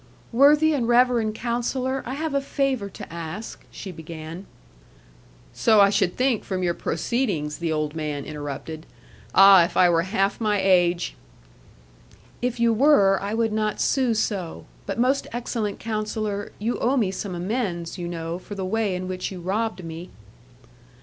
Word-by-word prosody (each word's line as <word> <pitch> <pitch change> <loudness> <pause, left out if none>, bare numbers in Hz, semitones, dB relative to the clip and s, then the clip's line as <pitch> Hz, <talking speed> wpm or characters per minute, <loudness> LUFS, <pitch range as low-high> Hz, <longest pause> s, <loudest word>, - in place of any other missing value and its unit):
'Worthy 295 +5 +5
and 250 -6 0
reverend 240 -3 +3
Counsellor, 250 +3 -2
I 260 - -3
have 315 0 -3
a 280 - +1
favour 270 -7 -1
to 185 - -10
ask,' 170 +6 -7
she 190 - -8
began. 160 +2 -9 1.1
'So 220 -2 +4
I 200 0 +6
should 190 -3 +1
think 255 -3 +1
from 185 -1 -3
your 175 -1 +1
proceedings,' 170 - -2
the 170 -1 -1
old 155 -1 -1
man 150 -3 -3
interrupted 150 +1 -6 0.5
'ah, 195 -2 +9
if 170 - -3
I 180 -1 +6
were 165 -1 +3
half 195 +3 -1
my 210 -2 +1
age' 175 - +2 1.3
'If 245 -1 -2
you 235 -1 +4
were, 215 -7 +5
I 200 +2 -2
would 225 -1 0
not 215 -1 -1
sue 255 -4 +2
so. 195 -6 -2 0.2
But - - -3
most 255 +4 +1
excellent 230 -3 -3
Counsellor, 215 -2 -3
you 225 +4 -2
owe 260 +4 +1
me 210 -6 +1
some 190 -1 -5
amends, 180 -3 -3
you 175 - -4
know, 170 0 -4
for 205 - -9
the 190 -1 -3
way 210 -1 0
in 185 0 -4
which 185 +1 -4
you 185 - -7
robbed 190 +1 -2
me.' 165 +2 -7
200 Hz, 165 wpm, -24 LUFS, 175-235 Hz, 1.3 s, ah